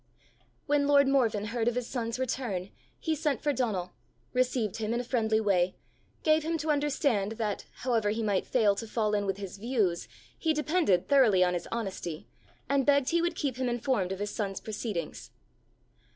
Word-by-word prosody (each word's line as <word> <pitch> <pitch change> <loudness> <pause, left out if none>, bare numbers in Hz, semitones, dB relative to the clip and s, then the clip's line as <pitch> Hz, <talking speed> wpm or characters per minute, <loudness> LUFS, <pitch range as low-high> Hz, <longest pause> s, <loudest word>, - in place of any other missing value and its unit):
When 290 -1 +2
lord 280 -1 +5
Morven 230 -7 +2
heard 235 -2 0
of 240 - +2
his 250 -1 -1
son's 230 -2 -3
return, 235 -7 -2 0.3
he 320 - -1
sent 300 -2 0
for 290 - +2
Donal, 205 -9 -1 0.4
received 250 -5 0
him 220 +1 -1
in - - 0
a - - -2
friendly 220 -3 +1
way, 185 -4 +2 0.5
gave 310 0 +4
him 325 +2 -1
to 310 0 0
understand 280 -8 +1
that, 215 -3 -3 0.2
however 230 -5 +2
he 220 +2 -1
might 200 -3 0
fail 215 -5 +3
to 225 - -4
fall 215 -1 0
in 205 -1 0
with 195 0 -1
his 195 -1 -7
views, 210 -7 0 0.3
he 320 - +1
depended 300 - +2
thoroughly 235 -10 +5
on 180 0 +2
his 175 -1 -3
honesty, 190 -8 -4 0.4
and 280 -1 +2
begged 280 -1 +3
he 340 0 +2
would 345 +1 0
keep 270 -5 -2
him 255 -1 0
informed 240 -6 0
of 190 - -2
his 205 +1 -3
son's 195 -3 -3
proceedings. 205 -7 -5
230 Hz, 185 wpm, -29 LUFS, 200-275 Hz, 0.5 s, lord